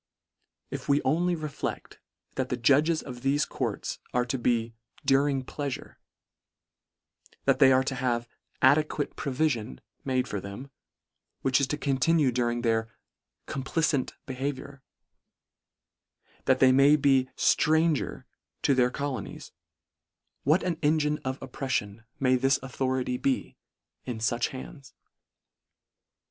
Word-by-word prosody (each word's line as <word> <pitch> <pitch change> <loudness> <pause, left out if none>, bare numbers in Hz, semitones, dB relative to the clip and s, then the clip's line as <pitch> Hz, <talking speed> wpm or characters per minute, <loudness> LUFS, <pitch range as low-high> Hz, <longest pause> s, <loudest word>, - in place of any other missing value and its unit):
If - - -6
we 140 +1 +4
only 175 +3 +2
reflecT: 155 -3 -5 0.4
that 130 -1 -2
the 125 - -1
judges 145 +7 +3
of 125 -3 -8
thefe 140 +3 +1
courts - - -3 0.2
are 125 0 +2
to 125 +1 -2
be 115 -1 0 0.3
during 135 -1 +3
pleafure 145 +1 -5 0.7
— - - -35
that - - +3
they 135 -1 +7
are 130 0 +4
to 135 - -2
have 120 -2 -1 0.2
" - - -41
adequate 150 -1 -2
provi/ion" 130 - -1 0.2
made 130 -2 0
for 100 - -4
them, 100 +9 -8 0.7
which 135 +1 +3
is 135 - +1
to 150 - -2
continue 140 +1 +2
during 120 -1 -1
their 110 -1 +1 0.6
complifant 140 0 -1
behaviour 135 +1 -5 0.8
— - - -39
that - - +3
they 130 -1 +6
may 135 +3 +6
be 140 -2 +4
LETTER - - -27
IX. - - -45
93 160 +1 +3 0.3
sftranger - - -15 0.4
to 140 - +4
thefe 125 -1 +2
colonies 140 -7 -5 0.5
— - - -56
what 155 +7 +3
an 175 -3 -1
engine 150 0 +2
of 130 +1 -4
oppreffion 120 -5 -3
may 130 -1 +3
this 135 +1 +3
authority 130 -1 -1
be 135 +1 -1 0.5
in 125 -3 -4
fuch 120 +2 0
hands 135 +1 -10
135 Hz, 135 wpm, -28 LUFS, 125-145 Hz, 0.8 s, they